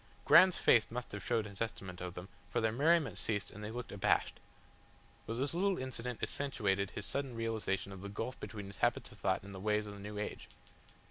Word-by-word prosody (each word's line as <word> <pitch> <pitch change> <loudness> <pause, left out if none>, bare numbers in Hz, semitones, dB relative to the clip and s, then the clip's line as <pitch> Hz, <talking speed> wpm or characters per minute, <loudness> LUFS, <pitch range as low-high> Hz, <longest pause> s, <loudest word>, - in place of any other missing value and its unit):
Graham's 185 -1 +8
face 115 -3 +5
must 125 +1 -5
have 105 -2 -6
showed 115 -3 +1
his 100 -1 -9
estimate 95 -5 -4
of 90 -1 -5
them, 90 +2 -7 0.2
for - - 0
their 110 0 +2
merriment 145 - +3
ceased 105 -3 -1
and 105 - -9
they 105 - -4
looked 120 +2 -5
abashed. 100 -1 +1 0.9
But 115 - -2
this 135 +5 -1
little 190 +2 +2
incident 125 -2 -4
accentuated 100 -8 0
his 105 - -4
sudden 135 -3 -2
realisation 110 -4 -1
of 95 -1 -8
the 100 - -6
gulf 115 +5 -4
between 105 -3 -6
his 100 +1 -9
habits - - +1
of - - -15
thought - - +1
and 100 0 -9
the 95 - -7
ways 105 +1 +1
of 105 - -7
the 100 - -10
new 105 +1 -6
age. 105 - -4
110 Hz, 215 wpm, -35 LUFS, 100-125 Hz, 0.9 s, Graham's